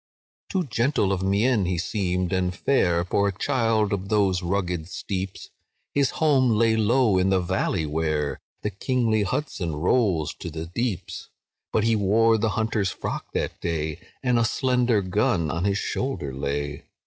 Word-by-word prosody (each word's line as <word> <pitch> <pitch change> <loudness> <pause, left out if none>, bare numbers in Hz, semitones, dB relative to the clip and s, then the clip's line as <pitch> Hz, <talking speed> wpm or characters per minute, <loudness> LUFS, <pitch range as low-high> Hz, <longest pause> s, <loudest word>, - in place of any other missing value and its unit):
"Too 190 -3 0
gentle 120 - +1
of 95 -1 0
mien 100 +3 +2
he 90 0 -1
seemed, 90 0 -1
and 90 -1 0
fair, 90 -8 +2
For 100 +2 +1
a - - +1
child 115 -6 +1
of 100 0 -3
those 100 -4 +2
rugged 90 -3 -2
steeps; 95 0 -5 0.4
His 140 -3 +2
home 140 -5 +3
lay 115 0 +3
low 110 -2 +3
in 95 +1 +2
the 95 -1 +3
valley, 90 -1 -1
where 75 -1 -1 0.2
The 105 - -1
kingly 110 +1 +1
Hudson 100 - -2
rolls 85 - +1
to 85 - -5
the 80 0 -5
deeps; 95 +1 -4 0.4
But 110 - +1
he 115 0 +3
wore 110 +2 +3
the 110 +1 +1
hunter's 110 -3 0
frock - - -5
that - - -3
day, 80 -1 -2 0.2
And 125 -2 +3
a - - +3
slender 125 -2 +1
gun 90 -4 +1
on 85 +3 -2
his 100 0 +1
shoulder 115 - -3
lay. 70 +1 -3
100 Hz, 160 wpm, -25 LUFS, 90-115 Hz, 0.4 s, home